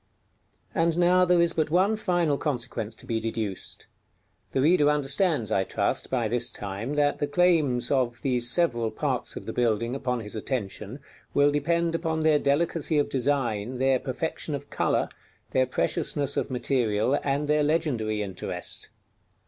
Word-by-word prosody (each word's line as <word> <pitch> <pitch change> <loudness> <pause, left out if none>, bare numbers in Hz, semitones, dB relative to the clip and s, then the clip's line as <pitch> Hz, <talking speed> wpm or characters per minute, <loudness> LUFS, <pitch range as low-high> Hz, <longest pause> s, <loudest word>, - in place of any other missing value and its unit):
_ - - -44 0.7
And 165 0 +1
now 180 +1 +4
there 180 -1 +3
is 170 0 +1
but 155 -2 0
one 190 +6 +3
final 175 -8 +1
consequence 120 -6 -3
to - - -13
be 115 -1 -1
deduced. 110 -3 -4 0.7
The 135 - +1
reader 150 -2 +4
understands, 145 - +2
I 95 - +2
trust, 95 - -1
by 120 -4 0
this 120 +2 +1
time, 105 +8 -5
that 145 -1 +1
the 145 - 0
claims 150 -6 +2
of 125 -4 +1
these 125 -3 +1
several 120 -7 +1
parts - - -2
of - - -7
the - - -5
building 115 0 0
upon 125 -3 -2
his 105 0 -8
attention 110 +1 -4 0.3
will 145 0 +5
depend 170 +3 0
upon 160 -1 -1
their 155 -1 +4
delicacy 155 +2 +1
of 145 - +1
design, 125 -4 -1
their 130 0 +2
perfection 150 +3 -3
of 140 0 -9
color, - - +1 0.4
their 130 0 +2
preciousness 140 +2 0
of - - -1
material, 125 -1 +1
and 145 +1 0
their 150 0 +3
legendary 125 -9 0
interest. 90 -2 -4
140 Hz, 160 wpm, -26 LUFS, 120-155 Hz, 0.7 s, will